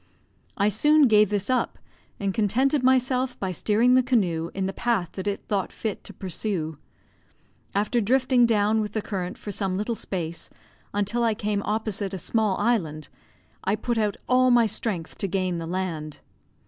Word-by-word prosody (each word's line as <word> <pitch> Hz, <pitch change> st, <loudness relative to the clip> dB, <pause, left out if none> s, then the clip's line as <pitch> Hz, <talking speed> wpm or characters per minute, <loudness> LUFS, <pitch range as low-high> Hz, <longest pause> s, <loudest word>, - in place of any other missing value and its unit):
I 200 Hz, +1 st, +3 dB
soon 295 Hz, +7 st, +4 dB
gave 210 Hz, -3 st, +5 dB
this 205 Hz, -1 st, -1 dB
up, 255 Hz, -1 st, 0 dB, 0.4 s
and 195 Hz, -1 st, -1 dB
contented 255 Hz, +8 st, +2 dB
myself 255 Hz, 0 st, +2 dB
by 190 Hz, -2 st, -2 dB
steering 220 Hz, +7 st, +3 dB
the 255 Hz, -, +6 dB
canoe 180 Hz, -10 st, 0 dB
in 190 Hz, 0 st, -1 dB
the 195 Hz, -, -2 dB
path 220 Hz, -8 st, 0 dB
that 190 Hz, +1 st, -6 dB
it 200 Hz, -, -2 dB
thought 200 Hz, -3 st, -1 dB
fit 220 Hz, -3 st, -4 dB
to -, -, -8 dB
pursue. 175 Hz, -5 st, -3 dB, 1.0 s
After 210 Hz, +4 st, +1 dB
drifting 250 Hz, +2 st, +3 dB
down 215 Hz, 0 st, +2 dB
with 210 Hz, -1 st, -4 dB
the 220 Hz, -, -1 dB
current 185 Hz, -4 st, -4 dB
for 205 Hz, -, -6 dB
some 190 Hz, -1 st, -2 dB
little 215 Hz, +4 st, -1 dB
space, 170 Hz, -6 st, -4 dB, 0.4 s
until 205 Hz, +4 st, 0 dB
I 225 Hz, -2 st, +2 dB
came 210 Hz, -1 st, -1 dB
opposite 210 Hz, -2 st, -2 dB
a -, -, -3 dB
small 210 Hz, +2 st, 0 dB
island, 170 Hz, -10 st, 0 dB, 0.5 s
I 200 Hz, -, +1 dB
put 230 Hz, +1 st, -1 dB
out 210 Hz, -2 st, 0 dB
all 255 Hz, 0 st, +4 dB
my 240 Hz, -2 st, +5 dB
strength 200 Hz, -5 st, -3 dB
to 195 Hz, -, 0 dB
gain 185 Hz, -2 st, -1 dB
the 165 Hz, -, -5 dB
land. 165 Hz, -4 st, -3 dB
210 Hz, 175 wpm, -25 LUFS, 190-235 Hz, 1.0 s, the